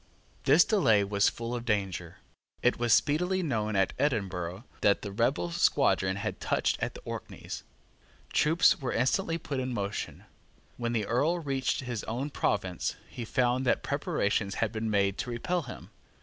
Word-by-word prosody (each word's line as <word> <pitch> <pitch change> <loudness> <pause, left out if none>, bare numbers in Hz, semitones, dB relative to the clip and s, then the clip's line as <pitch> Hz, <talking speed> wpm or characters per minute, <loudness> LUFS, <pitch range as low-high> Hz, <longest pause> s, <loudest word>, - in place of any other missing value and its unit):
This 155 +9 +6
delay 120 - +4
was 100 0 +2
full 115 +1 -5
of 120 -1 -3
danger. 95 -7 -2 0.5
It 125 - +3
was 120 -1 +1
speedily 180 - +3
known 110 -8 -1
at 95 -1 +2
Edinburgh 95 - -1 0.2
that 100 -1 +3
the 100 - -4
rebel 105 -5 0
squadron 95 +2 +2
had 100 - -4
touched - - 0
at - - -2
the - - -9
Orkneys. - - -7 0.7
Troops 160 +3 +4
were 130 - -2
instantly 165 +8 +1
put 145 -4 -4
in 130 0 -2
motion. 100 -1 -4 0.5
When 120 0 -2
the 110 -3 0
Earl 145 - +1
reached 135 -6 -1
his 120 -4 -4
own 130 +6 -3
province, 95 -8 -1 0.2
he 120 - -5
found 125 +2 +1
that - - +2
preparations 135 - 0
had 110 -2 0
been 110 -1 -2
made 100 -2 +1
to 125 - -3
repel 170 +10 -1
him. 130 - -10
120 Hz, 165 wpm, -29 LUFS, 100-140 Hz, 0.7 s, This